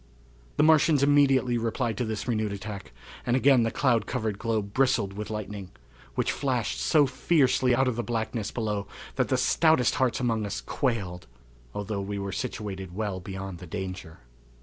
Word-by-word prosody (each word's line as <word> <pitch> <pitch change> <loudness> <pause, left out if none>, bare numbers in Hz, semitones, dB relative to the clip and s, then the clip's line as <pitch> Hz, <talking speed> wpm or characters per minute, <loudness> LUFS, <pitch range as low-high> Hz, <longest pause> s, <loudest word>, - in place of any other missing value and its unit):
The - - +4
Martians 155 -2 +5
immediately 135 -4 +4
replied 115 0 -1
to 125 - 0
this 110 +1 -4
renewed 110 -3 0
attack, 100 0 -7 0.3
and 120 - +1
again 135 -1 +5
the 115 - +2
cloud 125 -8 +1
covered 110 -2 -2
globe 110 -3 -2
bristled 125 -7 +2
with 105 +1 -6
lightning, 105 -3 -5 0.5
which - - +1
flashed 130 -5 -1
so 150 -3 +4
fiercely 130 -3 +2
out 130 +1 +2
of 125 -2 -1
the 120 - -1
blackness 115 -2 -2
below 105 -3 -2 0.3
that - - +1
the - - +1
stoutest 160 -7 +3
hearts 125 -3 +2
among 115 -4 0
us 100 -1 -3
quailed, 95 - -2 0.5
although 100 0 -3
we 100 +1 -4
were 100 0 -3
situated 95 -7 -5
well 100 -3 -2
beyond 95 -1 -6
the 90 - -10
danger. 90 -1 -6
110 Hz, 170 wpm, -27 LUFS, 100-130 Hz, 0.5 s, Martians